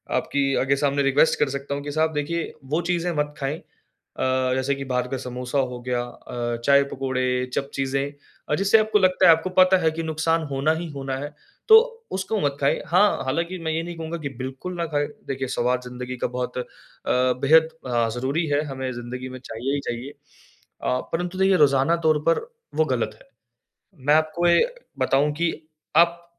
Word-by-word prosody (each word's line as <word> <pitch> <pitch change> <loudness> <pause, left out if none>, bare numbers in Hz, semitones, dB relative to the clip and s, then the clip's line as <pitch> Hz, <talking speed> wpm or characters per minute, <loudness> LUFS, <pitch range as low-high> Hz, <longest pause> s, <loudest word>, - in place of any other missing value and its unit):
आपकी 135 -1 0
आगे 135 +1 +2
सामने 140 0 +1
रिक्वेस्ट 135 +3 +3
कर 145 - +2
सकता 140 +1 -4
हूँ 140 - -5
कि 145 - -5
साहब 160 +1 +1
देखिए, 155 +3 -2
वो 155 +5 0
चीज़ें 175 0 -1
मत 150 0 -1
खाएँ 140 +2 -2 0.6
अ, 130 0 +1
जैसे 130 +2 0
कि 135 0 -6
बाहर 125 -1 -1
का 135 - -3
समोसा 125 +1 -4
हो 125 -2 -2
गया 125 0 -1
अ, 120 -1 -5
चाय-पकोड़े 130 -2 +2
चप 140 - -2
चीज़ें 135 +1 -1 0.4
अ, 150 - +2
जिससे 195 +5 +4
आपको 215 -1 +2
लगता 185 -1 +3
है, - - +10
आपको 165 +3 +2
पता 185 +1 +5
है 160 - +3
कि 165 +1 -4
नुकसान 160 +1 0
होना 140 +3 +1
ही 170 +1 -4
होना 135 -2 -4
है, 145 +2 -6 0.3
तो 445 - +10 0.3
उसको 190 +3 -1
मत 140 -1 0
खाएँ। 140 - +2
हाँ, 195 +4 +3
हालाँकि 170 +7 -2
मैं 160 - 0
ये 165 +1 -1
नहीं 175 0 -6
कहूँगा 165 +1 -4
कि 140 - -3
बिल्कुल 130 +8 -5
ना 170 - -1
खाएँ, 145 0 +1 0.2
देखिए 135 -1 -3
स्वाद 125 +1 0
ज़िंदगी 125 0 -6
का - - +3
बहुत 125 0 -3
अ, 125 - -1 0.5
बेहद 140 +6 +4 0.2
अ, 120 -2 +1
ज़रूरी 135 +7 -1
है, 145 0 +1
हमें 130 -2 -4
ज़िंदगी 125 +2 -6
में 130 0 -8
चाहिए 125 +3 -4
ही - - -1
चाहिए। 120 +3 -4 0.7
अ, 125 - +1
परंतु 175 +2 -2
देखिए 190 0 +4
रोजाना 140 +1 +4
तौर 155 -1 +4
पर 165 - +3 0.4
वो - - +3
गलत - - -1
है, - - -29 0.8
मैं 145 - +6
आपको 160 +2 +1
ये 170 - +5 0.3
बताऊँ 145 +2 +2
कि 170 +1 +1 0.5
आप 170 0 +4
140 Hz, 195 wpm, -24 LUFS, 130-165 Hz, 0.8 s, है